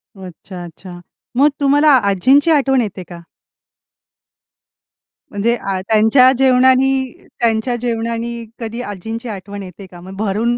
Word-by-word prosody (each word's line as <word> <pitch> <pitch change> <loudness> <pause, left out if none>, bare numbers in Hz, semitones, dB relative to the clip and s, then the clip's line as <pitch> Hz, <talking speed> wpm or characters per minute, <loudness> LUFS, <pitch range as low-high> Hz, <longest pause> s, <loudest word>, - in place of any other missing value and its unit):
अच्छा, 185 -1 -11
अच्छा. 175 +1 -11 0.4
मग 290 +2 +5
तुम्हाला 290 +2 +3 0.2
आजींची 270 - +3
आठवण 270 -4 +2
येते 200 -4 -5
का? 170 -1 -11 2.1
म्हणजे 225 +4 0
आ 195 -4 -3
त्यांच्या 220 +5 +4
जेवणानी 260 0 +2
त्यांच्या 230 +1 0
जेवणानी 235 0 -3
कधी 230 +1 -5
आजींची 225 +3 -7
आठवण 200 0 -8
येते 185 +1 -11
का? 175 -1 -14
मग 190 +2 -11
भरून 220 +3 -1
230 Hz, 120 wpm, -17 LUFS, 195-255 Hz, 2.1 s, मग